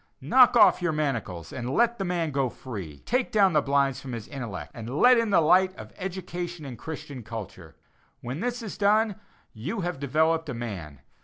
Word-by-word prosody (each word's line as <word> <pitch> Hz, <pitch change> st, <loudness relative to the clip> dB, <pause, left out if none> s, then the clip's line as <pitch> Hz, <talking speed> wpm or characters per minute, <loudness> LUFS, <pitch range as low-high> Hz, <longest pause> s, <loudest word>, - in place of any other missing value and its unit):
Knock 245 Hz, -, +5 dB
off 225 Hz, -, +6 dB
your 175 Hz, -2 st, 0 dB
manacles 115 Hz, -, -3 dB
and 120 Hz, -1 st, -4 dB
let 235 Hz, -1 st, +2 dB
the -, -, 0 dB
man 175 Hz, -4 st, -1 dB
go 135 Hz, -2 st, 0 dB
free. 95 Hz, -, -8 dB
Take 250 Hz, +2 st, 0 dB
down 195 Hz, -4 st, +4 dB
the 150 Hz, -, +4 dB
blinds 140 Hz, -1 st, +1 dB
from 130 Hz, -2 st, -7 dB
his 115 Hz, -2 st, -6 dB
intellect, 120 Hz, -9 st, -6 dB
and 120 Hz, +4 st, -6 dB
let 250 Hz, -1 st, +7 dB
in 230 Hz, -1 st, 0 dB
the 195 Hz, -, +5 dB
light 185 Hz, +4 st, +4 dB
of -, -, -10 dB
education 175 Hz, -3 st, -5 dB
and 130 Hz, -3 st, -7 dB
Christian 145 Hz, -1 st, -7 dB
culture. 110 Hz, -3 st, -8 dB, 0.4 s
When 125 Hz, +5 st, -5 dB
this 245 Hz, +2 st, -3 dB
is 215 Hz, -, -7 dB
done 210 Hz, 0 st, +3 dB, 0.4 s
you 160 Hz, -, -4 dB
have 175 Hz, -4 st, -3 dB
developed 160 Hz, +3 st, +1 dB
a 130 Hz, -, -3 dB
man. 90 Hz, -, -6 dB
155 Hz, 190 wpm, -26 LUFS, 120-190 Hz, 0.4 s, let